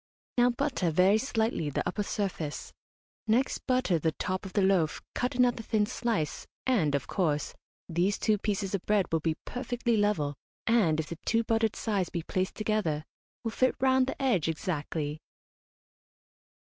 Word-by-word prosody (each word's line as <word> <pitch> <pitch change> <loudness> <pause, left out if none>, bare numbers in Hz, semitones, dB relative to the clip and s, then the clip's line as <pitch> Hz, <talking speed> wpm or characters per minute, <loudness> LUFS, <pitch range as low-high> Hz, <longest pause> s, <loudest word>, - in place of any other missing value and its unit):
Now 245 +1 +6
butter 250 - 0
very 185 +6 +4
slightly 220 - 0
the 140 - -2
upper 205 - -1
surface. 190 -7 -3 0.5
Next 240 +5 +2
butter 255 -10 +2
the 160 +1 0
top 185 +5 -3
of 185 - -11
the 200 - +3
loaf, 185 -5 +2
cut 250 0 -1
another 245 -2 +3
thin 215 -1 +1
slice, 215 -8 -2 0.2
and, 180 - +2
of 140 - -1
course, 150 -6 0 0.3
these 180 +4 +1
two 215 -2 +2
pieces 200 -2 -1
of 195 - -1
bread 210 -3 +3
will 165 - +2
be 160 0 0
perfectly 245 -2 -1
level, 205 -9 +1 0.3
and, 200 -10 +3
if 160 - 0
the 170 - -6
two 230 0 +2
buttered 225 -1 +1
sides 200 -5 -1
be 170 - -3
placed 185 +3 -2
together, 210 -9 0 0.4
will 225 - -2
fit 255 +3 +2
round 260 0 +4
the - - -4
edge 235 - +2
exactly. 155 -2 -2
200 Hz, 160 wpm, -29 LUFS, 165-230 Hz, 0.5 s, Now